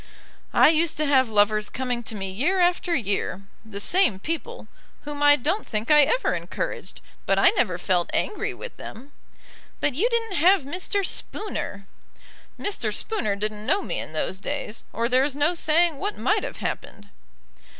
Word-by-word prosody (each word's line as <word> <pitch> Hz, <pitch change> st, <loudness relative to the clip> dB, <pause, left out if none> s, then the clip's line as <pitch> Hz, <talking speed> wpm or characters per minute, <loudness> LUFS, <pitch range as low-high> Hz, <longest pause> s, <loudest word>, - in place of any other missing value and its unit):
"I -, -, +7 dB
used 325 Hz, +1 st, +3 dB
to 305 Hz, -, +1 dB
have 265 Hz, -4 st, +3 dB
lovers 210 Hz, 0 st, +2 dB
coming 250 Hz, -2 st, -3 dB
to 220 Hz, -, -2 dB
me 195 Hz, -2 st, -4 dB
year 320 Hz, -, 0 dB
after 350 Hz, -1 st, +2 dB
year, 200 Hz, -, -2 dB, 0.2 s
the 215 Hz, -3 st, -8 dB
same 355 Hz, -, +2 dB
people, 330 Hz, -, -5 dB, 0.3 s
whom 290 Hz, 0 st, -7 dB
I 290 Hz, 0 st, +7 dB
don't 325 Hz, -, -1 dB
think 220 Hz, +4 st, -2 dB
I 300 Hz, 0 st, +8 dB
ever -, -, +1 dB
encouraged; -, -, -5 dB, 0.3 s
but -, -, +3 dB
I -, -, +6 dB
never 205 Hz, -, 0 dB
felt 180 Hz, -1 st, 0 dB
angry 425 Hz, -, -1 dB
with -, -, -9 dB
them." 265 Hz, +6 st, -10 dB, 0.7 s
"But 295 Hz, -, 0 dB
you 395 Hz, -, +1 dB
didn't 455 Hz, -5 st, -1 dB
have 365 Hz, +1 st, +5 dB
Mr. 370 Hz, +7 st, -2 dB
Spooner." 200 Hz, -, -3 dB, 0.7 s
"Mr. 405 Hz, 0 st, -2 dB
Spooner 215 Hz, -, +1 dB
didn't 210 Hz, +1 st, -4 dB
know 395 Hz, 0 st, +2 dB
me -, -, -3 dB
in -, -, -7 dB
those 185 Hz, +4 st, -2 dB
days, 230 Hz, -2 st, -5 dB
or 230 Hz, +2 st, -1 dB
there 255 Hz, +2 st, +3 dB
is 280 Hz, -1 st, -2 dB
no 295 Hz, +4 st, +2 dB
saying 330 Hz, -2 st, +2 dB
what 410 Hz, +1 st, -3 dB
might -, -, +1 dB
have -, -, -6 dB
happened." 205 Hz, -1 st, -6 dB
285 Hz, 170 wpm, -24 LUFS, 215-355 Hz, 0.7 s, I